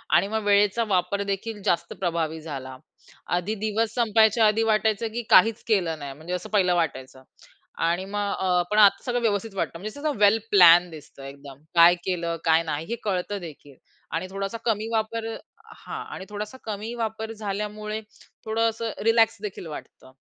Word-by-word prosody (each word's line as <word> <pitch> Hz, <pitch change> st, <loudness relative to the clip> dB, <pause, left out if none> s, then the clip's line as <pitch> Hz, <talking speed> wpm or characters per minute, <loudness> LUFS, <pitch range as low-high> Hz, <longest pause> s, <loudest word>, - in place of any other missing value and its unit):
आणि -, -, +4 dB
मग 220 Hz, +1 st, -2 dB
वेळेचा 205 Hz, +2 st, +3 dB
वापर 190 Hz, +1 st, 0 dB
देखील 205 Hz, +2 st, -4 dB
जास्त 170 Hz, 0 st, 0 dB
प्रभावी 165 Hz, -3 st, -1 dB
झाला. 135 Hz, -4 st, -7 dB, 0.6 s
आधी 185 Hz, +5 st, -2 dB
दिवस 220 Hz, +1 st, 0 dB
संपायच्या 220 Hz, -1 st, +4 dB
आधी 215 Hz, +1 st, +2 dB
वाटायचं, 220 Hz, 0 st, +1 dB
की 240 Hz, -, -2 dB
काहीच 225 Hz, +1 st, +5 dB
केलं 175 Hz, -8 st, +1 dB
नाही 140 Hz, -1 st, -6 dB
म्हणजे 160 Hz, +5 st, -7 dB
असं 180 Hz, -, -4 dB
पहिलं 185 Hz, -4 st, +2 dB
वाटायचं. 130 Hz, -5 st, -3 dB, 0.6 s
आणि 175 Hz, +3 st, 0 dB
मग 205 Hz, 0 st, -2 dB
अ, 180 Hz, -1 st, +2 dB
पण 210 Hz, -, +1 dB
आता 205 Hz, -2 st, +6 dB
सगळं 245 Hz, -1 st, -1 dB
व्यवस्थित 210 Hz, -1 st, -1 dB
वाटतं. 165 Hz, -, -3 dB
म्हणजे 215 Hz, +9 st, -7 dB
कसं 300 Hz, -4 st, -2 dB
वेल 210 Hz, +1 st, +5 dB
प्लॅन 175 Hz, -2 st, +7 dB
दिसतं 150 Hz, -3 st, -12 dB
एकदम, 140 Hz, 0 st, -11 dB
काय 170 Hz, +1 st, +7 dB
केलं 170 Hz, -2 st, -2 dB
काय 165 Hz, 0 st, +4 dB
नाही 155 Hz, -1 st, -3 dB
हे 235 Hz, -, -1 dB
कळत 195 Hz, -1 st, -2 dB
देखील. 145 Hz, -4 st, -11 dB, 0.4 s
आणि 165 Hz, +3 st, -2 dB
थोडासा 195 Hz, +3 st, -4 dB
कमी 220 Hz, -1 st, 0 dB
वापर 225 Hz, 0 st, -2 dB, 0.4 s
हां, -, -, -7 dB
आणि 190 Hz, -, -7 dB
थोडासा 210 Hz, +4 st, -6 dB
कमी 215 Hz, +2 st, -5 dB
वापर 220 Hz, -1 st, -4 dB
झाल्यामुळे 210 Hz, +1 st, -4 dB, 0.4 s
थोडं 225 Hz, +1 st, +1 dB
असं 225 Hz, 0 st, -4 dB
रिलॅक्स 225 Hz, 0 st, +4 dB
देखील 200 Hz, -4 st, -6 dB
वाटतं. 150 Hz, -3 st, -10 dB
200 Hz, 170 wpm, -25 LUFS, 170-220 Hz, 0.6 s, प्लॅन